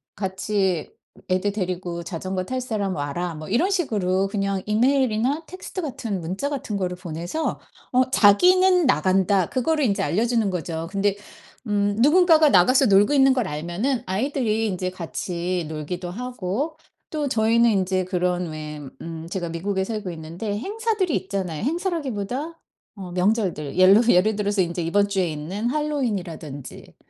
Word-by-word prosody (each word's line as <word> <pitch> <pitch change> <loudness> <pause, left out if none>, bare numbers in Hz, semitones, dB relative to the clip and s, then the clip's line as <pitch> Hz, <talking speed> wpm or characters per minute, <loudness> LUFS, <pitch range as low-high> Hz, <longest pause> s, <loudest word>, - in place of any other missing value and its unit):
같이 190 -3 -1 0.4
애들 185 +2 +1
데리고 180 -3 -3
자전거 185 +2 -4
탈 255 +7 -3
사람 205 -6 -2
와라." 155 +5 -3
뭐 155 0 -8
이런 285 - +2
식으로 195 - +1
그냥 195 -1 -1
이메일이나 255 +5 +2
텍스트 370 +1 -7
같은, 230 - -4
문자 190 +12 -3
같은 255 -7 -3
거를 180 -2 -2
보내서 175 - -4 0.3
어 255 +1 +3
'자기는 360 - +5
나간다.' 190 - +2
그거를 300 +3 +1
인제 200 -4 +1
알려주는 225 +6 +1
거죠. 165 -2 -4
근데 200 0 +1 0.5
음 205 -1 +1
누군가가 320 +1 +6
나가서 255 +7 +5
놀고 205 +6 +5
있는 270 -1 +5
걸 245 -6 0
알면은 175 - -2
아이들이 225 +2 0
인제 185 -3 -2
같이 175 0 -3
놀기도 160 +3 -5
하고 250 - -3 0.4
또 300 -2 -1
저희는 235 -1 +3
인제 190 -3 +1
그런 180 -1 -1
왜 155 -1 -6 0.2
음 165 0 -7
제가 175 -2 -3
미국에 190 +4 -2
살고 210 -1 -4
있는데 170 +6 -5
행사들이 410 - -1
있잖아요. 190 -3 -3
행사라기보다 300 - -3 0.4
어 190 -4 -8
명절들. 180 -5 0
옐러 190 +4 +7
예를 205 +2 +4
들어서 205 -1 0
이제 170 0 -3
이번 200 +5 +2
주에 195 -3 0
있는 175 +9 -4
할로윈이라든지 205 - -4
200 Hz, 335 characters per minute, -23 LUFS, 180-255 Hz, 0.5 s, 옐러